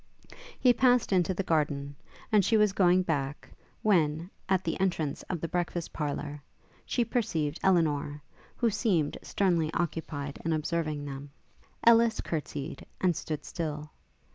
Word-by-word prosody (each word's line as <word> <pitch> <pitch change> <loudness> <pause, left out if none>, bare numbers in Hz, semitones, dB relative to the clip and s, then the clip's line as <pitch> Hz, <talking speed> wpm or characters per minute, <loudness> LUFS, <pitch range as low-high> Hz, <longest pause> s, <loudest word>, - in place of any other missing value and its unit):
He 250 -2 +6
passed 245 -3 +3
into 180 -1 +3
the 195 - -1
garden, 145 -4 0 0.4
and 210 -2 +5
she 225 +4 +3
was 210 -2 +4
going 185 -1 +4
back, 145 -4 -2 0.4
when, 170 -3 +2 0.2
at 190 -1 +2
the 165 - -2
entrance 170 -6 0
of 180 - -2
the 165 - -3
breakfast 175 -1 -2
parlour, 145 -1 -3 0.5
she 240 - +1
perceived 165 -11 -1
Elinor, 150 -5 +1 0.3
who 235 -2 +1
seemed 180 - +1
sternly 170 -5 +1
occupied 155 -4 -3
in 165 - 0
observing 155 -1 -1
them. 140 0 -7 0.6
Ellis 230 -1 +6
courtsied, 150 -1 -4 0.2
and 180 -3 +2
stood 155 -1 -4
still. 150 -3 -4
165 Hz, 140 wpm, -29 LUFS, 150-190 Hz, 0.6 s, He